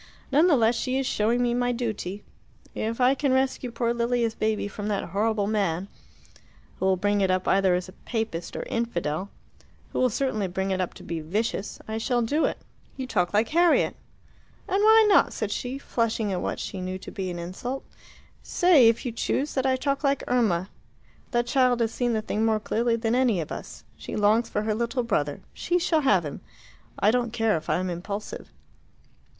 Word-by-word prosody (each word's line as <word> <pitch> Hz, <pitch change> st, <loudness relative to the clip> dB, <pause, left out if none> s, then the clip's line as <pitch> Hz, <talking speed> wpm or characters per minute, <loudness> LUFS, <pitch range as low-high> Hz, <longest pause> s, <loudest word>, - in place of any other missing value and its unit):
None 300 Hz, +6 st, +5 dB
the 325 Hz, -, +5 dB
less 230 Hz, -2 st, +3 dB
she 255 Hz, +2 st, -1 dB
is 270 Hz, -, 0 dB
showing 235 Hz, +2 st, +1 dB
me 240 Hz, -1 st, +1 dB
my 245 Hz, 0 st, +1 dB
duty. 215 Hz, -5 st, -4 dB, 0.5 s
If 225 Hz, +2 st, -3 dB
I 255 Hz, +1 st, +5 dB
can 275 Hz, -1 st, 0 dB
rescue 260 Hz, -1 st, 0 dB
poor 235 Hz, 0 st, -1 dB
Lilia's 235 Hz, -1 st, 0 dB
baby 215 Hz, -2 st, -1 dB
from 205 Hz, +1 st, -6 dB
that 205 Hz, -4 st, -2 dB
horrible 210 Hz, +2 st, 0 dB
man, 195 Hz, -3 st, -1 dB, 0.9 s
who 190 Hz, -, +1 dB
will 190 Hz, -1 st, +3 dB
bring 205 Hz, +2 st, +1 dB
it 190 Hz, -, +2 dB
up 185 Hz, 0 st, 0 dB
either 190 Hz, -2 st, +4 dB
as 180 Hz, +1 st, -2 dB, 0.2 s
Papist 220 Hz, -8 st, -3 dB
or -, -, -3 dB
infidel 190 Hz, -6 st, -2 dB, 0.6 s
who -, -, -2 dB
will 255 Hz, -, +4 dB
certainly 220 Hz, -4 st, -1 dB
bring 190 Hz, +2 st, -2 dB
it 185 Hz, 0 st, 0 dB
up 180 Hz, -, -3 dB
to -, -, -12 dB
be 170 Hz, -1 st, -4 dB
vicious 200 Hz, +6 st, -2 dB
I 220 Hz, 0 st, -3 dB
shall 240 Hz, +1 st, +1 dB
do 295 Hz, +8 st, +1 dB
it." -, -, -1 dB, 0.4 s
"You 265 Hz, -, -3 dB
talk 185 Hz, -8 st, 0 dB
like 215 Hz, +2 st, +2 dB
Harriet." 340 Hz, +1 st, +3 dB, 0.7 s
"And 390 Hz, +2 st, +1 dB
why 440 Hz, 0 st, +7 dB
not?" 395 Hz, -4 st, +4 dB
said 210 Hz, -2 st, -3 dB
she, 250 Hz, +5 st, -3 dB
flushing 230 Hz, -6 st, -1 dB
at 180 Hz, -, -2 dB
what -, -, -3 dB
she 190 Hz, -, -5 dB
knew 185 Hz, +1 st, -3 dB
to -, -, -10 dB
be 190 Hz, -3 st, -4 dB
an 175 Hz, -, -5 dB
insult. 190 Hz, +10 st, -5 dB, 0.6 s
"Say, 340 Hz, -9 st, +5 dB
if 230 Hz, +2 st, +2 dB
you 245 Hz, -, -1 dB
choose, 275 Hz, +5 st, -1 dB
that 265 Hz, -1 st, 0 dB
I 260 Hz, -, +3 dB
talk 275 Hz, +2 st, -1 dB
like 275 Hz, -1 st, +1 dB
Irma. 205 Hz, -7 st, +1 dB, 0.6 s
That 240 Hz, -2 st, +1 dB
child 250 Hz, -1 st, +3 dB
has 230 Hz, -1 st, +1 dB
seen 245 Hz, -1 st, 0 dB
the 215 Hz, -1 st, -1 dB
thing 215 Hz, 0 st, -1 dB
more 220 Hz, -1 st, +2 dB
clearly 230 Hz, +2 st, 0 dB
than 225 Hz, 0 st, -1 dB
any 245 Hz, -6 st, +3 dB
of 160 Hz, -, -5 dB
us. -, -, -8 dB
She -, -, -7 dB
longs 215 Hz, +3 st, +3 dB
for 210 Hz, -, -1 dB
her 215 Hz, 0 st, 0 dB
little 235 Hz, +3 st, -1 dB
brother. 145 Hz, -11 st, -1 dB
She 355 Hz, -, 0 dB
shall 330 Hz, -2 st, +2 dB
have 275 Hz, -1 st, +3 dB
him. -, -, -6 dB, 0.6 s
I 210 Hz, -, +4 dB
don't 240 Hz, -1 st, 0 dB
care 225 Hz, -3 st, +1 dB
if 160 Hz, -, -5 dB
I -, -, +3 dB
am 185 Hz, 0 st, -2 dB
impulsive." 200 Hz, +4 st, -6 dB
225 Hz, 200 wpm, -26 LUFS, 200-250 Hz, 0.9 s, why